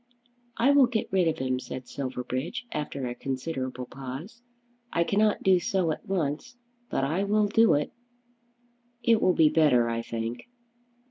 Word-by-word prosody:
"I 260 +4 +4
will 280 -3 +6
get 235 -3 -2
rid 185 -3 +3
of 160 - 0
him," 130 -1 -1
said 130 -1 -7
Silverbridge, 130 - -4
after 145 -3 -3
a 120 - -3
considerable 130 -1 -4
pause. 135 - -8 0.5
"I 170 - +2
cannot 210 +4 +1
do 190 -1 +5
so 180 -2 0
at - - -6
once, 165 - -2 0.3
but - - -1
I 160 +8 0
will 210 +1 +2
do 225 -2 +4
it." 145 - -1 1.1
"It 230 -2 +4
will 185 - +4
be 155 -2 +5
better, 145 -7 +4
I 115 0 -1
think." 115 - -5
155 Hz, 155 wpm, -27 LUFS, 130-200 Hz, 1.1 s, will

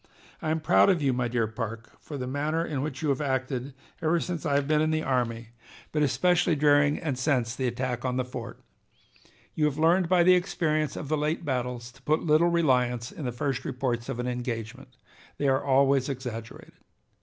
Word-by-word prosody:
"I 155 - -2
am 160 +1 +1
proud 160 - +5
of 185 -3 +3
you, 135 -2 +2
my 125 -1 0
dear 120 -1 0
Parke, 115 0 -6
for 145 - -8
the 130 - -4
manner 150 +5 -1
in 145 -5 -3
which 140 -1 -4
you 150 - +1
have 140 +1 0
acted 130 -1 -2 0.3
ever 165 +1 +2
since 170 -2 -3
I 140 - +1
have 140 -1 +1
been 155 0 +3
in 155 - +2
the 155 0 0
army, 115 -3 -1 0.4
but 150 - 0
especially 175 +3 +2
during 145 0 +4
and 140 -5 -3
since 125 -4 0
the 130 -1 -1
attack 125 0 -3
on 125 -1 -1
the 130 - 0
fort. 125 -2 -8 0.9
You 155 - +1
have 150 -1 0
learned 165 +2 +3
by 180 -2 +5
the 185 +1 +6
experience 155 -5 0
of 145 - -5
the 155 +2 0
late 155 +3 -1
battles 125 -3 -3
to 135 - -21
put 155 +3 +1
little 160 +2 +4
reliance 125 -8 +1
in 150 - -7
the 125 - -1
first 130 +2 -2
reports 125 -3 -2
of - - -3
an 125 - -3
engagement; 125 +1 -5 0.4
they 145 - 0
are 135 0 +2
always 135 0 +3
exaggerated. 120 -4 -7
135 Hz, 205 wpm, -27 LUFS, 125-155 Hz, 0.9 s, the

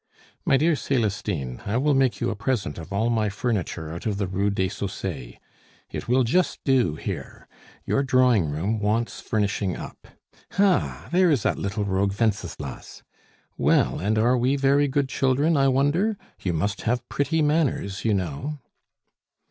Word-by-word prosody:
"My 135 - +4
dear 160 +3 +3
Celestine, 100 - -2
I 100 +3 -1
will 145 +3 +2
make 135 -2 +2
you - - 0
a - - -3
present 100 - -2
of 80 +3 -9
all 110 +4 +1
my 110 -2 +1
furniture 95 -7 -2
out 85 +6 -5
of 105 -2 -1
the 100 - 0
Rue 95 +2 0
des 95 -2 0
Saussayes; 80 -11 -5 0.6
it - - -5
will 125 +2 +3
just 175 +10 +1
do 130 - +2
here. - - -6 0.4
Your 140 - +1
drawing 125 - +3
room 95 +10 -1
wants 110 +3 -1
furnishing 100 -3 -1
up. - - -9 0.5
Ha! 195 -2 +1
there 180 0 +4
is 140 -9 +2
that - - 0
little 100 +1 -2
rogue 100 +1 0
Wenceslas. 95 - -3 0.6
Well, - - +3
and 105 +3 0
are 120 +3 +3
we 130 +3 +2
very 140 +1 +3
good 140 0 0
children, 135 +5 +2
I 135 -1 +4
wonder? 145 +11 +2 0.2
You 90 - -1
must 100 +5 -1
have 120 +1 -1
pretty 160 +2 0
manners, 145 -10 0
you 110 -3 +2
know." 95 - -3
115 Hz, 165 wpm, -25 LUFS, 100-135 Hz, 0.6 s, My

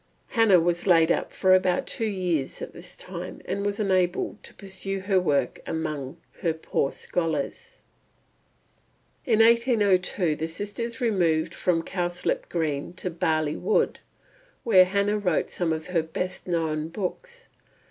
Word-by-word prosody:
Hannah 225 -6 +5
was 175 +2 0
laid 165 -2 +5
up - - 0
for 185 -1 +3
about 185 -1 +3
two 225 - -2
years 175 -8 -2
at - - -7
this - - -7
time, - - -7
and 200 - -2
was 205 0 -2
unable 185 0 0
to - - -11
pursue 195 0 -2
her 190 0 +2
work 140 -8 0
amongst 155 -2 -4 0.2
her 165 -2 0
poor 140 -3 -1
scholars. 160 -5 -3 1.4
In 225 -2 +4
1802 210 -8 +3
the 160 - -2
sisters 220 +8 -4
removed 170 -8 +1
from 165 -2 0
Cowslip 175 0 -2
Green 155 -2 -2
to 180 0 -4
Barley 155 -2 0
Wood; 440 - +1 0.7
here 185 -5 +7
Hannah 200 +2 +1
wrote 180 -6 0
some 175 -2 -1
of 160 -1 -2
her 180 -2 +1
best 170 +4 -5
known 160 -3 -1
books. 475 - -6
180 Hz, 140 wpm, -26 LUFS, 160-200 Hz, 1.4 s, here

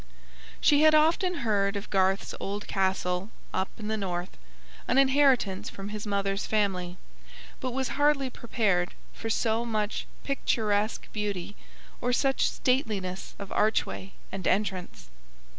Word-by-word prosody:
She 290 0 +5
had 310 0 +7
often 335 +4 +3
heard 200 -2 +2
of 200 - -5
Garth's 190 0 +2
old 205 +1 -4
castle 190 0 0 0.2
up 190 0 0
in 215 - -6
the 220 - 0
North, 180 -3 -3 0.5
an 250 - +2
inheritance 265 -8 +4
from 195 +1 -7
his 210 0 -5
mother's 200 0 -1
family, 185 -4 0 0.6
but 255 -2 -2
was 265 +1 -1
hardly 290 -1 +2
prepared 200 -8 0 0.2
for 225 - -5
so 225 0 +1
much 215 -2 -2 0.2
picturesque 215 -6 0
beauty 205 -2 -3 0.5
or 245 0 +1
such 270 +1 +2
stateliness 210 -8 -1
of 200 -1 -8
archway 210 -2 0 0.2
and 190 -2 -3
entrance. 185 - -1
210 Hz, 130 wpm, -28 LUFS, 195-250 Hz, 0.6 s, had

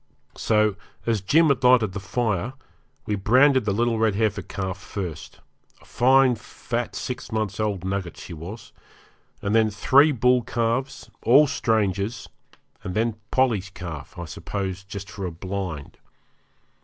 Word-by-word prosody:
So, 105 -2 +2 0.3
as 115 -4 +1
Jim 155 - +4
had 135 -2 +1
lighted 125 -5 +5
the 100 - -4
fire, 105 +2 -1 0.5
we 105 - -2
branded 130 +5 +4
the 105 - +1
little 115 +2 +1
red 110 -3 +2
heifer 110 -1 0
calf 95 0 -5
first 90 -5 -7 0.4
a - - -21
fine 130 +1 +4
fat 120 +1 -5
six 125 -1 -5
months 110 -3 -2
old 100 -4 -1
nugget 95 -2 -3
she 90 - -9
was 90 +8 -9 0.7
and 100 +1 0
then 110 -1 +4
three 135 +8 +4
bull 125 -1 +3
calves, 120 +3 -2
all 140 +6 +6
strangers, 110 -3 -1 0.6
and 90 - -5
then 115 0 +1
Polly's 115 -8 +1
calf, 90 -1 -8
I 90 - -5
suppose 95 +3 -5
just 100 0 -8
for 100 -3 -5
a - - -5
blind. 90 -3 -6
105 Hz, 145 wpm, -24 LUFS, 95-120 Hz, 0.7 s, all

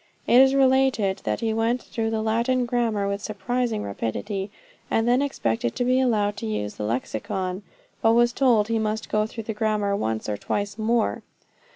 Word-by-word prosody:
It 245 - +6
is 265 0 +5
related, 260 -7 +3
that - - -1
he 225 -1 0
went 225 +3 +1
through 225 -1 -3
the 220 -1 -1
Latin 235 +3 +1
grammar 230 -4 0
with 200 +1 -2
surprising 230 +1 -2
rapidity, 190 - -3 0.4
and 225 +1 +1
then 245 +2 +4
expected 115 - -1
to 245 - 0
be 255 +1 +3
allowed 210 -5 +1
to - - -4
use 105 -1 -3
the 105 - -5
Lexicon, 180 - -3 0.4
but 225 0 +4
was 240 0 +4
told 235 -6 +3
he 225 0 0
must 220 0 -2
go 215 0 +1
through 225 0 -7
the 220 - -4
grammar 210 -2 0
once 110 - -2
or 105 -1 -2
twice 205 - -3
more. 225 +1 +1
220 Hz, 185 wpm, -24 LUFS, 200-240 Hz, 0.4 s, It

